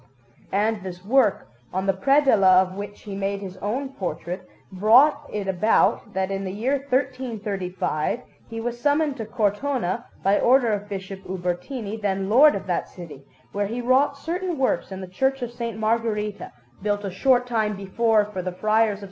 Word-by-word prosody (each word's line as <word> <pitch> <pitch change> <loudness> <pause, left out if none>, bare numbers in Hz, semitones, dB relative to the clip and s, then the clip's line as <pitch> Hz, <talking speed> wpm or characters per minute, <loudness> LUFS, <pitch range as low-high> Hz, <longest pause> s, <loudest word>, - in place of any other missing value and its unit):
And 210 +1 +1
this 185 -1 -8
work, 240 -2 +2 0.2
on 190 +1 -2
the 195 - +2
predella 225 -10 +5
of 185 0 -8
which 205 +1 -7
he 205 - -7
made 195 0 -2
his 190 -2 -7
own 245 +8 -3
portrait, 180 - -5 0.2
brought 255 +10 +4
it 205 -2 -3
about 190 +2 +2
that 190 0 -1
in 195 0 -2
the 190 - -4
year 240 +8 0
1335 220 - -2 0.3
he 225 0 -5
was 240 +1 -4
summoned 290 0 +2
to 225 -3 -5
Cortona 225 0 -1 0.2
by 195 +1 +3
order 245 -3 +4
of 205 0 -4
Bishop 195 -1 -6
Ubertini, 190 +5 -3
then 195 -1 -1
lord 290 +6 +7
of 195 - -5
that 180 -3 -2
city, 160 -6 -10 0.3
where 205 0 -1
he 230 +4 -4
wrought 260 +3 +2
certain 350 +3 -3
works 260 -6 0
in 190 0 -6
the 185 - -6
Church 265 +8 0
of 240 - -4
S. 230 -2 -2
Margherita, 215 -1 -1 0.3
built 205 0 -1
a 195 - -3
short 245 +6 +3
time 220 -4 0
before 210 +2 +2
for 205 -3 -5
the 185 0 -3
Friars 215 +3 +2
of - - -7
S. - - -14
210 Hz, 180 wpm, -24 LUFS, 190-245 Hz, 0.3 s, lord